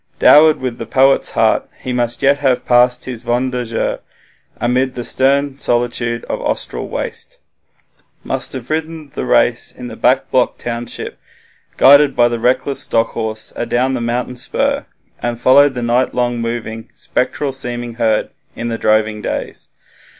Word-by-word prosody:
Dowered 155 +1 +6
with 125 -2 -4
the 115 - -6
poet's 135 +3 +3
heart, - - +2
he 130 - -4
must 120 -1 -1
yet 140 +1 +4
have 135 -3 +1
passed 125 0 +3
his 125 -2 -7
'wander 125 +1 -1
jaehre' 115 -1 -2 0.6
amid 125 +2 0
the 120 - -4
stern 140 +2 +1
solitude 120 -1 -1
of - - -4
the - - -6
Austral - - -3
waste - - -5 0.9
must 135 0 -3
have 130 +1 -7
ridden 160 -1 -4
the - - -4
race 120 -1 +2
in 125 -1 -9
the - - -8
back 130 +2 +1
block 125 -1 +1
township, 120 0 -6 0.6
guided 140 0 +6
the 120 -1 +2
reckless 130 +3 +1
stock 115 0 +1
horse 110 -1 -4
adown 125 +2 0
the 125 - -2
mountain 120 +2 -2
spur, 125 - -1 0.3
and 120 0 -3
followed 140 +2 +5
the 125 - -3
night 120 +2 +1
long 120 -1 0
moving, 115 -1 -5
spectral 135 +2 -2
seeming 120 -2 -5
herd 110 -2 +1 0.2
'in 120 - -4
the 115 - -3
droving 110 0 +1
days'. - - -5
125 Hz, 155 wpm, -17 LUFS, 120-130 Hz, 0.9 s, Dowered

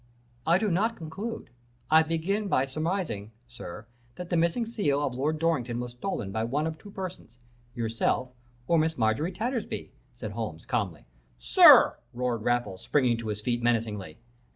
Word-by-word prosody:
"'I 170 +2 +5
do 210 0 0
not 220 +7 +1
conclude; 195 - -6 0.4
I 160 +1 +8
begin 165 +6 -1
by 130 -8 +2
surmising, 155 - -3
sir, 115 -3 -9 0.3
that 180 +3 -7
the - - 0
missing 170 +8 +2
seal 200 -11 0
of 130 - -2
Lord 145 +5 -1
Dorrington 130 -8 0
was 125 0 -4
stolen 120 - -4
by 110 +3 -1
one 140 +7 0
of 160 -1 -4
two 205 - -12
persons 185 - -7 0.4
yourself 115 +2 0 0.4
or 170 - +4
Miss 160 +1 0
Marjorie 115 +9 +1
Tattersby,' 230 +4 -3 0.2
said 115 -4 -6
Holmes, 105 -7 -5
calmly. 100 - -2 0.3
"'Sir!' - - +7 0.2
roared 125 -2 -1
Raffles, 110 -5 -1
springing 125 -5 +2
to 115 -1 -6
his 105 -1 -3
feet 120 0 0
menacingly. 110 -8 -1
130 Hz, 160 wpm, -28 LUFS, 115-170 Hz, 0.4 s, I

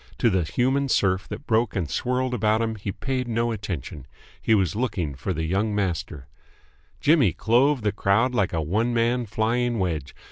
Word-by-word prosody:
To 115 - +3
the 95 -1 +2
human 130 - 0
surf 95 -4 +1
that 145 - -7
broke 110 0 +1
and 90 -5 -1
swirled 125 - -1
about 110 -2 +2
him 115 -1 -1
he 100 -2 -5
paid 130 +4 -3
no 115 0 0
attention. 85 - -5 0.3
He 110 - +3
was 95 -5 +1
looking 100 - -2
for 70 +8 -4
the 80 -2 -2
young 100 +6 0
master. 85 -9 -3 0.7
Jimmy 140 - +4
clove 125 +3 +2
the 105 - +2
crowd 105 +5 +1
like 105 -5 +1
a 80 -2 -1
one 110 +9 0
man 120 +1 +1
flying 115 +3 0
wedge. 80 -8 -2
110 Hz, 180 wpm, -24 LUFS, 95-120 Hz, 0.7 s, Jimmy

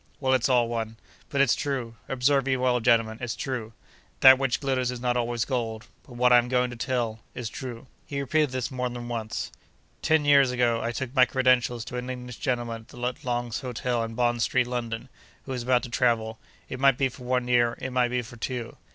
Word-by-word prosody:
Well, 130 -2 +1
it's 130 0 +2
all 120 -2 +4
one. 115 -1 -4 0.3
But 140 - +1
it's 140 -4 +4
true. 130 -5 -3
Observe 135 +1 +2
me 130 -1 +2
well, 125 -1 +2
gentlemen, 115 -1 +2
it's 120 -2 -3
true. 120 -5 -4 0.5
That 130 0 +9
which 135 -3 0
glitters 130 -3 0
is 125 -1 -4
not 125 0 0
always 120 -1 0
gold; 115 -4 -3 0.2
but 125 - -12
what 125 +1 +4
I 120 - +8
am 120 - -1
going 125 -1 +1
to - - -7
tell, 115 -2 -2 0.2
is 120 -3 -4
true.' 120 +1 -7 0.2
He 140 - -3
repeated 150 +2 +1
this 130 0 -3
more 125 -1 -2
than 120 0 -7
once. 110 -2 -4 0.5
Ten 155 -1 +2
years 140 -2 +6
ago, 120 -2 +1
I 115 - -1
took 120 +2 -4
my 130 -3 +6
credentials 125 -2 +2
to 125 - -6
an 125 +1 -4
English 125 -1 -6
gentleman 120 -3 -2
at 125 0 -4
Long's 120 -2 -2
Hotel, 125 -2 -2
in 115 0 -6
Bond 120 0 +1
Street, 125 +2 +2
London, 120 -2 -4 0.4
who 135 - -8
was 125 -2 -2
about 125 0 +2
to - - -6
travel—it 115 +1 -2
might 135 -2 +4
be 135 - +2
for 125 0 -11
one 125 0 0
year, 120 -1 +3
it 130 - -4
might 125 -1 +2
be 125 0 -1
for 120 +1 -12
two. 120 0 -5
125 Hz, 215 wpm, -26 LUFS, 120-130 Hz, 0.5 s, That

